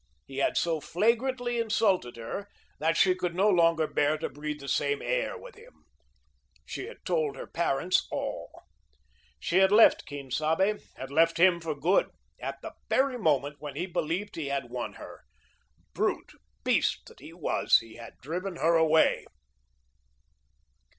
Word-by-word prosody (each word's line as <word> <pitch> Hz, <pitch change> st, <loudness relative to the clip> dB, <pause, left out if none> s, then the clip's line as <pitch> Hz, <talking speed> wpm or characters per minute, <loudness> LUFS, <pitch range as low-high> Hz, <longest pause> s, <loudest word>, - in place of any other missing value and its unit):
He 135 Hz, -, -10 dB
had 140 Hz, -, +1 dB
so 165 Hz, -2 st, +1 dB
flagrantly 240 Hz, -, 0 dB
insulted 210 Hz, -, +1 dB
her 115 Hz, -, -6 dB, 0.3 s
that 165 Hz, +2 st, +1 dB
she 185 Hz, +2 st, +5 dB
could 180 Hz, -2 st, -3 dB
no 195 Hz, +3 st, +3 dB
longer 165 Hz, -4 st, +3 dB
bear 150 Hz, 0 st, +1 dB
to 160 Hz, -, -4 dB
breathe 150 Hz, +1 st, -5 dB
the 140 Hz, -, -9 dB
same 140 Hz, +1 st, 0 dB
air -, -, -1 dB
with -, -, -12 dB
him. 465 Hz, +3 st, -19 dB, 0.8 s
She 390 Hz, -, -6 dB
had 475 Hz, -, -13 dB
told 155 Hz, -6 st, 0 dB
her -, -, -7 dB
parents 170 Hz, +1 st, 0 dB
all. -, -, -5 dB, 0.8 s
She 175 Hz, -, 0 dB
had 190 Hz, 0 st, +5 dB
left 220 Hz, +2 st, +6 dB
Quien 140 Hz, -2 st, -8 dB
Sabe 165 Hz, +9 st, +1 dB, 0.2 s
had 130 Hz, +1 st, -8 dB
left 165 Hz, +3 st, +3 dB
him 175 Hz, 0 st, +4 dB
for 160 Hz, -2 st, -3 dB
good, 170 Hz, +7 st, +2 dB, 0.3 s
at -, -, -5 dB
the -, -, -7 dB, 0.2 s
very 265 Hz, -2 st, +2 dB
moment 145 Hz, -, +1 dB
when 145 Hz, -2 st, -7 dB
he 170 Hz, +5 st, -2 dB
believed 180 Hz, +3 st, -3 dB
he 155 Hz, -4 st, -4 dB
had 135 Hz, -3 st, -3 dB
won 125 Hz, -1 st, -4 dB
her. -, -, -11 dB, 0.7 s
Brute, -, -, -1 dB, 0.3 s
beast -, -, +1 dB
that -, -, -16 dB
he -, -, -11 dB
was, -, -, +2 dB
he 115 Hz, -1 st, -9 dB
had 115 Hz, -1 st, -11 dB
driven 180 Hz, +6 st, -4 dB
her 170 Hz, 0 st, +2 dB
away. 160 Hz, -1 st, +3 dB
165 Hz, 160 wpm, -28 LUFS, 145-195 Hz, 0.8 s, left